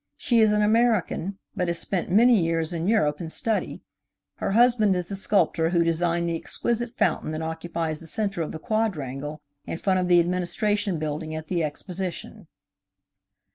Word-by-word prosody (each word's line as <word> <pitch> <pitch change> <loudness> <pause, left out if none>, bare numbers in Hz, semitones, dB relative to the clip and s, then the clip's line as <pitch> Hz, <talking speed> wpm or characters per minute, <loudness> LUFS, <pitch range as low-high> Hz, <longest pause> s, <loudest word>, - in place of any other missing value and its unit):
She 240 -4 +2
is 220 -1 +5
an 210 0 +2
American, 215 -4 +1 0.2
but 180 - -1
has 170 0 0
spent 180 +1 -2
many 225 +2 +5
years 165 0 -1
in 170 +1 -2
Europe 165 -9 +2
in 165 - -5
study. 220 +6 -2 0.5
Her 195 - -2
husband 230 -4 +4
is 180 -1 -3
the 200 - -2
sculptor 180 -5 +1
who 170 -1 +2
designed 170 +1 +1
the 170 - -1
exquisite 235 +7 -2
fountain 230 - 0
that 155 +1 -3
occupies 160 -1 -3
the 165 - -7
center 200 -1 -1
of 155 - -3
the - - -5
quadrangle 150 - -3 0.2
in - - -4
front 185 +1 +1
of 180 - 0
the 175 -1 +6
Administration 185 +3 0
Building 155 +1 -4
at 155 0 -7
the 175 -3 0
Exposition. 180 +4 -5
175 Hz, 175 wpm, -25 LUFS, 165-210 Hz, 0.5 s, the